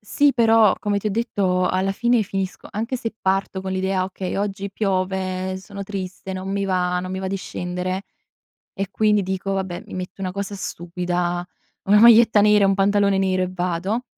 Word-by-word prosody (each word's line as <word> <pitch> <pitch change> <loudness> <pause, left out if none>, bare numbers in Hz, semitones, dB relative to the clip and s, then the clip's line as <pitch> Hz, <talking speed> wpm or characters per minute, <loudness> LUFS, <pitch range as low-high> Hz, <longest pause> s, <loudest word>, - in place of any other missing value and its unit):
sì 280 +7 +2
però 225 -4 +5
come 205 -3 0
ti 215 - -5
ho - - +1
detto 195 -4 0
alla 190 +1 0
fine 240 +2 +2
finisco 195 -1 -4
anche 230 +5 -2
se 225 -2 -5
parto 190 0 0
con 190 0 -4
l'idea: 190 0 0
"Okay 185 0 -5
oggi 200 0 -3
piove, 185 -2 -1
sono 200 +1 -8
triste, 190 -1 -6
non 185 +1 -5
mi 200 0 -1
va, 180 -2 0
non 185 - -6
mi 190 - -3
va 190 - -3
di 195 - -2
scendere". 180 0 -4 0.7
E 195 0 -4
quindi 210 0 +2
dico: 190 +1 -3
"Va 195 -1 0
beh 175 -2 -7
mi - - -9
metto 185 +1 -6
una 185 -1 -2
cosa 200 +1 -4
stupida, 175 -1 -3 0.4
una 205 +2 +5
maglietta 225 -2 +7
nera 210 0 +5
e - - +5
un 195 - +3
pantalone 200 0 +2
nero 185 -1 +1
e 185 - -1
vado". 185 +5 -2
195 Hz, 195 wpm, -22 LUFS, 185-205 Hz, 0.7 s, maglietta